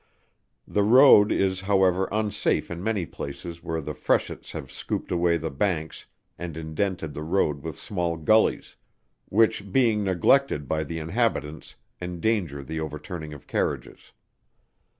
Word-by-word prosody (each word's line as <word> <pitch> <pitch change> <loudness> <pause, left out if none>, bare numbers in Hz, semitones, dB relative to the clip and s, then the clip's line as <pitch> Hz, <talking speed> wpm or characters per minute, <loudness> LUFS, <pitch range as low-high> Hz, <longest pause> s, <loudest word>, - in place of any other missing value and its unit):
The 105 - +1
road, 110 -1 +7
is 95 -1 +1
however, 95 -1 +2
unsafe 105 -3 0
in 85 +1 -5
many 105 -5 0
places 85 +4 -7
where 80 0 -2
the 75 +1 -5
freshets - - -1
have 65 - -7
scooped - - -4
away 85 -1 +2
the 80 0 -4
banks 80 +1 -2 0.3
and 85 -2 -6
indented 80 0 -3
the 75 - -6
road 75 -3 0
with 80 +1 -6
small 85 -4 -2
gullies, 110 +8 +2 0.5
which 105 -2 +2
being 115 -4 +3
neglected 95 - +2
by 80 +2 -1
the 80 +3 -5
inhabitants, 80 -2 -2 0.3
endanger 90 -4 -1
the 80 +3 -5
overturning 80 +1 -6
of 75 - -11
carriages. - - -3
85 Hz, 135 wpm, -25 LUFS, 80-100 Hz, 0.5 s, road